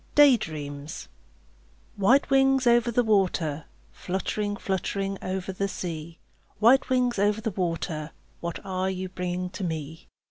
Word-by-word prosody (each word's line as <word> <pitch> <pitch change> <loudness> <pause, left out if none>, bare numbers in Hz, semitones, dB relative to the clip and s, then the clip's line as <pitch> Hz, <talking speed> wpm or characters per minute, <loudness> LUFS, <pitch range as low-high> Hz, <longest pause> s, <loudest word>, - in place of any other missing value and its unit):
DAY 290 -3 +8
DREAMS 145 -5 -6 0.9
White 250 +8 +3
wings 270 -1 +4
over 240 0 +4
the 245 +2 +2
water, 180 -8 +1 0.3
Fluttering, 205 +2 -3
fluttering 195 0 -2
over 185 0 -3
the 195 +1 -2
sea, 170 -4 -6 0.4
White 240 +6 +5
wings 250 -4 +1
over 205 +1 +2
the 220 0 -2
water, 165 -4 -2 0.3
What 170 +3 -5
are 185 0 -1
you 185 0 -4
bringing 180 0 -3
to 190 +1 -6
me? 160 -2 -5
190 Hz, 135 wpm, -26 LUFS, 170-220 Hz, 0.9 s, DAY